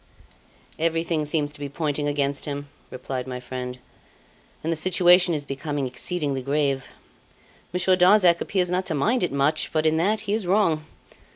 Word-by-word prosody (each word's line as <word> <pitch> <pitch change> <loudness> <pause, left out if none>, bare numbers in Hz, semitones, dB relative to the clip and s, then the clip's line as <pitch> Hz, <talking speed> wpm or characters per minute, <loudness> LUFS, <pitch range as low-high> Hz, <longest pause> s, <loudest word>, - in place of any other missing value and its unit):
"Everything 165 -1 0
seems 150 -1 -1
to 150 - -15
be 145 -1 -5
pointing 145 0 -2
against 140 -1 -1
him," 145 -1 -5 0.2
replied 130 0 -5
my 125 -1 -5
friend, 125 0 -6 0.9
"and 165 +1 0
the - - -3
situation 180 +1 +4
is 145 -1 -4
becoming 140 0 -3
exceedingly 140 +1 -2
grave. 140 0 -1 0.8
Monsieur 180 +1 +2
Darzac 180 -1 +5
appears 180 -2 0
not 185 +1 -1
to 160 - -1
mind 225 - +1
it 180 - 0
much; 140 +3 +1
but 155 -1 0
in 155 0 +3
that 210 +6 +1
he 205 -1 -2
is 215 -4 -1
wrong. 165 -6 +2
155 Hz, 165 wpm, -24 LUFS, 140-180 Hz, 0.9 s, Darzac